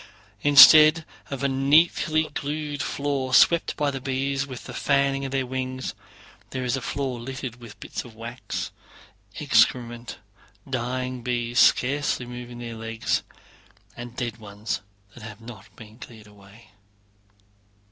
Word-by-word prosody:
Instead 155 Hz, +3 st, +8 dB, 0.2 s
of 140 Hz, 0 st, -5 dB
a -, -, +3 dB
neatly 155 Hz, +3 st, +3 dB
glued 145 Hz, 0 st, -4 dB
floor, 140 Hz, -2 st, -1 dB
swept 170 Hz, 0 st, +4 dB
by 145 Hz, -1 st, 0 dB
the 135 Hz, -1 st, -6 dB
bees 135 Hz, +1 st, -2 dB
with 130 Hz, -3 st, -8 dB
the -, -, -9 dB
fanning 140 Hz, -1 st, +1 dB
of 135 Hz, -, -5 dB
their 135 Hz, -1 st, -1 dB
wings, 130 Hz, 0 st, -4 dB, 0.6 s
there 130 Hz, +1 st, -4 dB
is 125 Hz, +1 st, 0 dB
a 135 Hz, -, -4 dB
floor 130 Hz, -3 st, -3 dB
littered 130 Hz, 0 st, -6 dB
with 120 Hz, -3 st, -13 dB
bits -, -, -6 dB
of 120 Hz, -3 st, -14 dB
wax, 120 Hz, +3 st, -6 dB, 0.7 s
excrement, 120 Hz, -2 st, +1 dB, 0.5 s
dying 130 Hz, 0 st, -3 dB
bees 120 Hz, -1 st, -1 dB
scarcely 135 Hz, -1 st, +2 dB
moving 120 Hz, 0 st, -9 dB
their 120 Hz, -1 st, -7 dB
legs, 115 Hz, 0 st, -2 dB, 0.7 s
and 120 Hz, 0 st, -9 dB
dead 120 Hz, -4 st, -4 dB
ones 105 Hz, 0 st, -5 dB, 0.3 s
that 120 Hz, -, -13 dB
have 110 Hz, -2 st, -10 dB
not 115 Hz, -4 st, -12 dB
been 110 Hz, +1 st, -14 dB
cleared 110 Hz, -4 st, -12 dB
away. 105 Hz, +2 st, -18 dB
130 Hz, 135 wpm, -24 LUFS, 120-140 Hz, 0.7 s, Instead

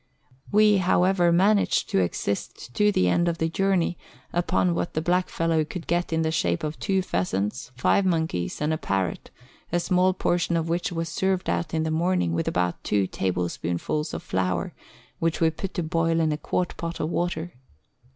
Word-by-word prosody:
We, 210 Hz, 0 st, +5 dB
however, 180 Hz, -1 st, +3 dB
managed 200 Hz, +4 st, +3 dB
to -, -, +3 dB
exist 100 Hz, +6 st, -3 dB
to 210 Hz, +6 st, +3 dB
the 90 Hz, -, +2 dB
end 170 Hz, -, +2 dB
of 170 Hz, -1 st, 0 dB
the 160 Hz, 0 st, 0 dB
journey 185 Hz, -1 st, +1 dB, 0.3 s
upon 175 Hz, 0 st, +1 dB
what 170 Hz, -, -3 dB
the 155 Hz, -, +1 dB
blackfellow 165 Hz, -2 st, +1 dB
could 165 Hz, +2 st, -7 dB
get 175 Hz, +1 st, 0 dB
in 160 Hz, 0 st, +1 dB
the 160 Hz, -, 0 dB
shape 85 Hz, -, 0 dB
of 155 Hz, 0 st, -4 dB
two 190 Hz, -2 st, +1 dB
pheasants, 100 Hz, -, -2 dB
five 130 Hz, +10 st, +3 dB
monkeys, 160 Hz, -, -1 dB
and 150 Hz, +1 st, +1 dB
a 155 Hz, -, -2 dB
parrot, 95 Hz, -3 st, -2 dB, 0.4 s
a 175 Hz, -, +2 dB
small 180 Hz, +1 st, +2 dB
portion 175 Hz, -2 st, +1 dB
of 165 Hz, 0 st, -1 dB
which 175 Hz, +2 st, -1 dB
was 165 Hz, -1 st, -2 dB
served 190 Hz, +2 st, 0 dB
out 165 Hz, -, -2 dB
in 160 Hz, -, +1 dB
the 160 Hz, -, -1 dB
morning 165 Hz, -, +1 dB
with 85 Hz, 0 st, -1 dB
about 90 Hz, 0 st, -1 dB
two 100 Hz, -2 st, +1 dB
table 90 Hz, -1 st, -1 dB
spoonfuls 85 Hz, -, -3 dB
of -, -, -5 dB
flour, 90 Hz, -2 st, -1 dB, 0.5 s
which 165 Hz, -1 st, 0 dB
we 160 Hz, -1 st, +3 dB
put 190 Hz, +4 st, -6 dB
to 175 Hz, -, -1 dB
boil 165 Hz, +1 st, +1 dB
in 160 Hz, -1 st, +2 dB
a 150 Hz, -, -1 dB
quart 180 Hz, +3 st, -2 dB
pot 170 Hz, 0 st, -4 dB
of 155 Hz, -, -2 dB
water. 175 Hz, -1 st, -2 dB
165 Hz, 190 wpm, -25 LUFS, 125-180 Hz, 0.5 s, We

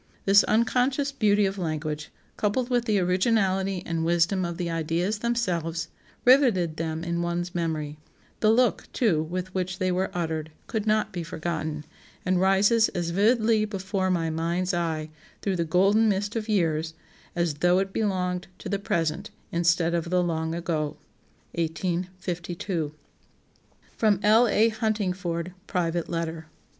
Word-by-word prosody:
This 200 Hz, +1 st, +7 dB
unconscious 255 Hz, +5 st, +2 dB
beauty 210 Hz, -6 st, +3 dB
of 195 Hz, 0 st, -2 dB
language, 155 Hz, -2 st, -3 dB, 0.3 s
coupled 240 Hz, +5 st, 0 dB
with 240 Hz, -1 st, +2 dB
the 215 Hz, -3 st, +2 dB
originality 190 Hz, 0 st, +1 dB
and 165 Hz, -1 st, -2 dB
wisdom 175 Hz, +3 st, +2 dB
of 170 Hz, -1 st, -4 dB
the 180 Hz, -2 st, -2 dB
ideas 170 Hz, +5 st, -1 dB
themselves, 180 Hz, -9 st, -1 dB, 0.4 s
riveted 230 Hz, -, +4 dB
them 160 Hz, 0 st, -3 dB
in 170 Hz, 0 st, -1 dB
one's 175 Hz, +1 st, -2 dB
memory; 155 Hz, -3 st, -2 dB, 0.4 s
the 215 Hz, -, +3 dB
look, 245 Hz, +3 st, +3 dB
too, 195 Hz, -11 st, +2 dB
with 180 Hz, +3 st, -4 dB
which 185 Hz, -1 st, -2 dB
they 185 Hz, 0 st, 0 dB
were 185 Hz, +1 st, 0 dB
uttered, 160 Hz, -2 st, -3 dB, 0.2 s
could 220 Hz, -2 st, -3 dB
not 215 Hz, 0 st, +1 dB
be 175 Hz, -, -3 dB
forgotten, 160 Hz, -2 st, -4 dB, 0.4 s
and 185 Hz, 0 st, +2 dB
rises 205 Hz, +4 st, +4 dB
as 170 Hz, -1 st, -1 dB
vividly 220 Hz, +3 st, +3 dB
before 195 Hz, -2 st, -2 dB
my 165 Hz, -3 st, 0 dB
mind's 170 Hz, +3 st, -1 dB
eye 160 Hz, -3 st, -2 dB, 0.3 s
'through 195 Hz, -2 st, 0 dB
the 170 Hz, -, 0 dB
golden 195 Hz, +7 st, +4 dB
mist 205 Hz, +2 st, -1 dB
of 225 Hz, -1 st, -3 dB
years' 160 Hz, -5 st, 0 dB, 0.4 s
as 170 Hz, -3 st, +1 dB
though 175 Hz, 0 st, +4 dB
it 195 Hz, 0 st, -1 dB
belonged 180 Hz, -4 st, -1 dB
to -, -, -7 dB
the 200 Hz, -, -1 dB
present, 170 Hz, 0 st, -1 dB, 0.2 s
instead 170 Hz, 0 st, +2 dB
of 170 Hz, 0 st, -1 dB
the 180 Hz, 0 st, +2 dB
'long 160 Hz, -1 st, -1 dB
ago.'" 155 Hz, -3 st, -2 dB, 0.6 s
1852. 175 Hz, 0 st, -3 dB, 1.1 s
[Sidenote: 210 Hz, -4 st, +3 dB
L. 220 Hz, +3 st, +6 dB
A. 220 Hz, +1 st, +4 dB
Huntingford: 190 Hz, -6 st, -2 dB, 0.2 s
private 170 Hz, -2 st, -1 dB
letter. 165 Hz, -1 st, -3 dB
180 Hz, 145 wpm, -26 LUFS, 165-205 Hz, 1.1 s, This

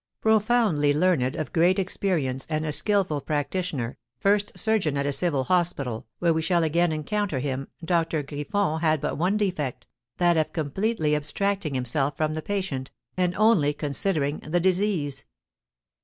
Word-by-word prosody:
Profoundly 215 Hz, -9 st, +3 dB
learned, 150 Hz, -6 st, +2 dB
of 155 Hz, -5 st, -4 dB
great 175 Hz, +3 st, +4 dB
experience, 175 Hz, -9 st, -1 dB
and 155 Hz, 0 st, -1 dB
a 150 Hz, -, -1 dB
skilful 185 Hz, -4 st, +1 dB
practitioner, 145 Hz, -4 st, -2 dB, 0.2 s
first 205 Hz, +7 st, +2 dB
surgeon 205 Hz, -10 st, +1 dB
at 140 Hz, -, 0 dB
a 145 Hz, -, +1 dB
civil 145 Hz, -4 st, +2 dB
hospital, 140 Hz, -9 st, 0 dB
where 170 Hz, -1 st, +2 dB
we 160 Hz, -, 0 dB
shall 170 Hz, +1 st, +2 dB
again 170 Hz, +2 st, +2 dB
encounter 155 Hz, +2 st, -2 dB
him, 135 Hz, 0 st, -3 dB, 0.2 s
Doctor 165 Hz, -3 st, +1 dB
Griffon 155 Hz, +4 st, -1 dB
had 155 Hz, -2 st, +2 dB
but -, -, -3 dB
one 185 Hz, +5 st, +2 dB
defect, 175 Hz, -, -2 dB, 0.3 s
that 175 Hz, -1 st, +3 dB
of 155 Hz, +3 st, 0 dB
completely 160 Hz, +1 st, 0 dB
abstracting 160 Hz, +2 st, -1 dB
himself 135 Hz, +3 st, -1 dB
from 155 Hz, 0 st, 0 dB
the 155 Hz, -, -3 dB
patient, 170 Hz, -9 st, -3 dB, 0.3 s
and 180 Hz, -1 st, 0 dB
only 195 Hz, -10 st, +3 dB
considering 150 Hz, 0 st, -1 dB
the 165 Hz, +4 st, -1 dB
disease. 185 Hz, -6 st, 0 dB
160 Hz, 150 wpm, -25 LUFS, 145-190 Hz, 0.3 s, great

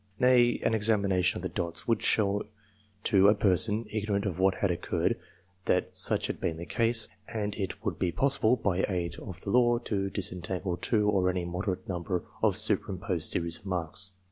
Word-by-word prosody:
Nay, 125 Hz, -1 st, +4 dB
an -, -, +2 dB
examination 100 Hz, -4 st, +2 dB
of -, -, -6 dB
the 90 Hz, -, -2 dB
dots 85 Hz, 0 st, -3 dB
would 115 Hz, -2 st, +1 dB
show 105 Hz, -1 st, +1 dB, 0.6 s
to 100 Hz, -3 st, +5 dB
a 105 Hz, -, +5 dB
person, 105 Hz, +3 st, +2 dB
ignorant 105 Hz, -1 st, -1 dB
of 95 Hz, -3 st, -3 dB
what 95 Hz, 0 st, +3 dB
had 100 Hz, -, 0 dB
occurred, 85 Hz, -, -1 dB, 0.5 s
that -, -, 0 dB
such -, -, +3 dB
had -, -, -4 dB
been 80 Hz, -, -1 dB
the 85 Hz, -, -6 dB
case, 115 Hz, +2 st, +2 dB, 0.2 s
and 105 Hz, -2 st, -2 dB
it 100 Hz, -3 st, -5 dB
would -, -, -2 dB
be 90 Hz, -, 0 dB
possible, 130 Hz, 0 st, +2 dB
by 95 Hz, -5 st, -1 dB
aid 90 Hz, -3 st, -3 dB
of 95 Hz, -3 st, -9 dB
the 100 Hz, -, -4 dB
law, 120 Hz, 0 st, +4 dB
to 100 Hz, -4 st, -2 dB
dis 100 Hz, -1 st, 0 dB
entangle 90 Hz, 0 st, -4 dB
two 105 Hz, +3 st, +1 dB
or 95 Hz, -3 st, +2 dB
any 90 Hz, -1 st, -2 dB
moderate 90 Hz, +1 st, -3 dB
number 90 Hz, 0 st, -3 dB, 0.2 s
of -, -, +2 dB
superimposed 95 Hz, -3 st, -1 dB
series 85 Hz, 0 st, -1 dB
of 100 Hz, -, -13 dB
marks. 95 Hz, +2 st, -3 dB
100 Hz, 190 wpm, -29 LUFS, 90-110 Hz, 0.6 s, to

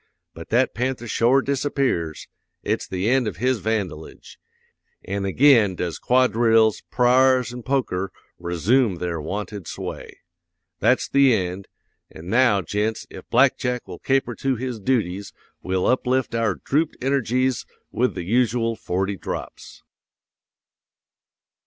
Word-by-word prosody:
But -, -, -11 dB
that 125 Hz, +3 st, +2 dB
panther 125 Hz, 0 st, -3 dB
shore 125 Hz, +4 st, +3 dB
disappears; 135 Hz, -, -1 dB, 0.4 s
it's -, -, -2 dB
the 95 Hz, +2 st, -2 dB
end 125 Hz, -1 st, +2 dB
of 105 Hz, -, -4 dB
his 130 Hz, -1 st, +1 dB
vandalage; 100 Hz, -8 st, -4 dB, 0.7 s
an' 100 Hz, +1 st, -3 dB
ag'in 115 Hz, -3 st, +4 dB
does 85 Hz, -1 st, -4 dB
quadrilles, 115 Hz, -3 st, +3 dB
pra'rs, 125 Hz, 0 st, +3 dB
an 125 Hz, -, -7 dB
poker 115 Hz, -8 st, -1 dB, 0.3 s
resoom 90 Hz, -, +1 dB
their 85 Hz, -2 st, -3 dB
wonted 100 Hz, +2 st, -5 dB
sway. -, -, -7 dB, 0.6 s
That's 120 Hz, +5 st, +2 dB
the 140 Hz, -3 st, +4 dB
end; 95 Hz, -1 st, -3 dB, 0.4 s
an' 85 Hz, +3 st, -11 dB
now, 115 Hz, -5 st, +3 dB
gents, 105 Hz, +5 st, -2 dB
if -, -, -11 dB
Black 130 Hz, +3 st, +4 dB
Jack 125 Hz, -1 st, -2 dB
will -, -, -9 dB
caper 135 Hz, -2 st, 0 dB
to 135 Hz, +4 st, -1 dB
his 125 Hz, -1 st, -4 dB
dooties 100 Hz, -4 st, -1 dB, 0.3 s
we'll 95 Hz, 0 st, -1 dB
uplift 130 Hz, 0 st, +1 dB
our 115 Hz, -1 st, 0 dB
drooped 155 Hz, +3 st, -1 dB
energies 130 Hz, -1 st, 0 dB, 0.2 s
with 125 Hz, +2 st, 0 dB
the -, -, -4 dB
usual 115 Hz, +2 st, +1 dB
forty 95 Hz, 0 st, -2 dB
drops.'" -, -, -7 dB
115 Hz, 125 wpm, -23 LUFS, 100-130 Hz, 0.7 s, ag'in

